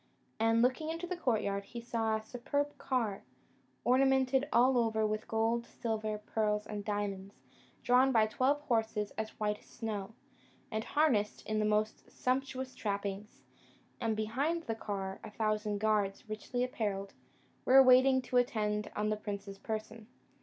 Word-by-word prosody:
And, 225 +1 +4
looking 260 +5 +1
into 330 +2 -3
the 365 +1 -3
courtyard, 215 - 0
he 235 +4 -8
saw 225 -2 -1
a 220 - -3
superb 285 +5 -2
car, 230 -7 -1 0.6
ornamented 265 +2 +3
all 250 +1 +5
over 220 -2 +1
with 215 0 -2
gold, 225 +1 0
silver, 215 -2 -3
pearls, 210 0 -1
and 210 -1 -5
diamonds, 200 -1 -3 0.5
drawn 255 +2 +5
by 225 -3 +5
twelve 260 +6 +1
horses 225 -6 0
as 220 0 -6
white 210 -1 0
as - - -22
snow, 215 -2 -5 0.6
and 220 0 -1
harnessed 250 -10 +1
in 215 0 -1
the 215 - +2
most 215 +1 0
sumptuous 260 0 -2
trappings; 200 0 -4 0.6
and 225 -3 0
behind 275 +10 -1
the 225 - -2
car 195 -3 -4
a - - -7
thousand 215 -1 -1
guards, 205 -1 0
richly 215 +3 -3
apparelled, 205 -6 -2 0.5
were 265 +1 +8
waiting 260 +1 +6
to 250 0 0
attend 210 -4 +1
on 210 0 0
the 215 - 0
prince's 200 -1 -6
person. 220 0 -5
220 Hz, 150 wpm, -33 LUFS, 210-255 Hz, 0.6 s, were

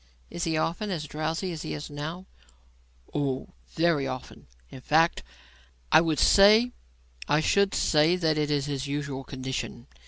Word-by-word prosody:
"Is 170 - -3
he 160 -1 0
often 170 +6 -2
as 170 -5 -3
drowsy 160 +5 -3
as 160 -2 -6
he - - -4
is 150 0 -7
now?" 160 +6 -6 0.9
"Oh, 140 -3 -2 0.2
very 160 -5 +1
often; 130 -1 -8 0.2
in 130 - -10
fact, 160 - +2 0.7
I - - +7 1.4
should 200 +5 +2
say 155 +3 +3
that 160 -4 +1
is 145 -2 0
his 140 -1 -3
usual 140 -1 -4
condition. 130 -2 -5
150 Hz, 130 wpm, -27 LUFS, 140-165 Hz, 1.4 s, I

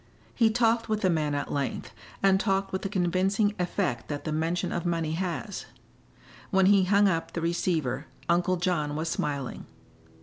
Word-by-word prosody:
He 230 -2 +4
talked 230 0 +2
with 215 -1 0
the 185 - +3
man 150 -3 0
at 145 - -3
length, 140 -2 -3 0.3
and 195 -1 +5
talked 195 -1 0
with 190 - -1
the 195 - -3
convincing 195 +3 +1
effect 175 - -1
that 145 -1 -4
the 155 - -3
mention 165 +3 -1
of 175 - -2
money 165 -2 -1
has. 185 +4 -3 0.8
When 190 -2 +3
he 195 -1 +5
hung 200 +2 +4
up 165 -3 -1
the 170 - -3
receiver 160 -5 -1 0.2
Uncle 175 +1 +2
John 170 -5 0
was 160 +2 -2
smiling. 140 -5 -3
175 Hz, 170 wpm, -27 LUFS, 155-195 Hz, 0.8 s, and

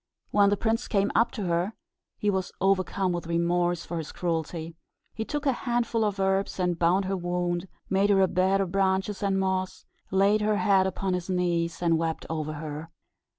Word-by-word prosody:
When 200 -1 +5
the 205 - +1
prince 225 +3 0
came 200 -1 +1
up 230 +2 +3
to 215 - -4
her, 175 +4 0 0.4
he 210 - +1
was 190 -2 -2
overcome 190 0 +1
with 175 -1 -3
remorse 175 0 +1
for 170 - -4
his 155 - -6
cruelty. 165 -1 -3 0.4
He 220 - -3
took 295 +5 -4
a 275 - +4
handful 235 -2 0
of 205 -2 -1
herbs 195 0 0
and 180 -2 0
bound 180 +3 +3
up - - -3
her 195 - 0
wound, 175 0 -2 0.2
made 195 +1 +2
her 200 -1 +4
a 190 - +5
bed 190 +2 +2
of 185 -3 -2
branches 190 +1 0
and 195 -1 +1
moss, 190 -1 -2 0.2
laid 200 +3 +3
her 210 0 +2
head 195 -2 +3
upon 190 0 -2
his 180 0 -3
knees, 175 -2 0
and 165 -1 +3
wept 165 -1 -2
over 155 -1 -2
her. 155 +1 -6
190 Hz, 195 wpm, -27 LUFS, 175-200 Hz, 0.4 s, When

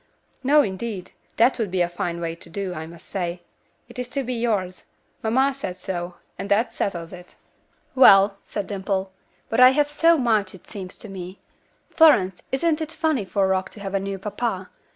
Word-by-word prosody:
"No, 290 +3 +5
indeed. 195 -1 -5 0.3
That 240 +3 +4
would 220 -4 -1
be 180 0 0
a 175 - +3
fine 175 0 -4
way 165 -1 -3
to 170 0 -13
do, 190 +1 -4
I 160 -1 -6
must 170 +1 -14
say. 175 -2 -4 0.4
It 240 +1 -10
is 250 0 -4
to 275 +1 -2
be 250 0 -3
yours. 210 -6 -2 0.4
Mamma 260 +5 +2
said 230 -10 -5
so, 180 -1 -5 0.2
and 195 +2 -5
that 210 +4 +2
settles 170 -4 -3
it." 180 0 -12 0.6
"Well," 200 -6 +7
said 205 - -4
Dimple. 195 -1 -2 0.4
"But 225 - -1
I 255 0 +10
have 295 0 +2
so 330 +3 +4
much, 215 -7 +1
it 185 - -17
seems 190 -4 -7
to - - -8
me. 185 -1 -8 0.5
Florence, 195 - +5
isn't 310 +4 +1
it 315 0 -4
funny 315 -9 0
for 195 0 +1
Rock 190 0 0
to - - -13
have 195 -1 -6
a 195 - +2
new 195 0 -4
papa? 200 -1 -3
195 Hz, 195 wpm, -23 LUFS, 185-245 Hz, 0.6 s, I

